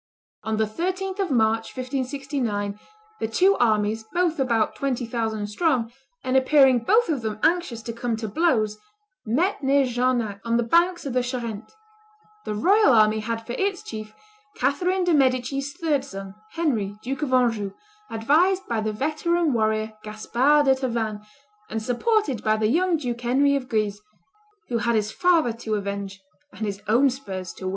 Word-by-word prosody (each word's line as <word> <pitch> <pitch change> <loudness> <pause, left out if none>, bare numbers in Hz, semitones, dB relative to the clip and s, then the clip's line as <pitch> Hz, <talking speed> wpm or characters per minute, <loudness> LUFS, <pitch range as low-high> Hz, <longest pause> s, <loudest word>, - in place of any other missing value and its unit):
On 220 0 -2
the 220 - +2
13th 370 - -3
of 385 -2 0
March, 225 -2 +1
1569, 255 -6 -3 0.4
the 220 - -1
two 375 - +3
armies, 220 -1 +1
both 345 -3 0
about 230 -5 +1
twenty 260 -3 -2
thousand 225 -2 -2
strong, 235 +1 0 0.3
and 255 0 -1
appearing 265 -1 +5
both 435 - +3
of 295 -6 -1
them 215 -1 -4
anxious 330 -10 +1
to 230 - -5
come 235 0 -2
to 220 0 -4
blows, 215 - +1 0.5
met 330 - +1
near 275 +1 +3
Jarnac, 240 -5 -1
on 230 0 +1
the 240 - +1
banks 345 +8 +2
of 270 - -3
the 250 - +2
Charente; 235 -4 -5 0.7
the 210 - -3
royal 390 - +4
army 215 -1 +4
had 225 +1 -4
for 240 - -6
its 390 +6 -1
chief 215 - -8 0.4
Catherine 355 +8 0
de' 355 -1 +2
Medici's 270 0 +1
third 300 -5 0
son, 195 -4 -8 0.2
Henry, 225 -12 -1
Duke 270 +4 -4
of 290 -3 -2
Anjou, 230 -6 +2 0.4
advised 330 +12 +2
by 230 -2 -1
the 215 0 -1
veteran 310 +6 0
warrior 220 -1 0
Gaspard 245 +8 +2
de 265 - +5
Tavannes, 230 -5 -2 0.5
and 225 - -2
supported 260 - 0
by 215 0 +2
the 215 0 +1
young 350 +3 +2
Duke 240 -5 -4
Henry 275 +4 +3
of 260 -2 -3
Guise, 210 -2 -1 0.7
who 235 - 0
had 235 +1 +1
his 215 0 0
father 335 -8 +2
to 220 -2 -1
avenge 200 -1 -4 0.3
and 220 - -5
his 200 -1 -4
own 250 +6 +4
spurs 190 -8 -6
to 185 - -7
win. - - 0
245 Hz, 170 wpm, -24 LUFS, 220-290 Hz, 0.7 s, appearing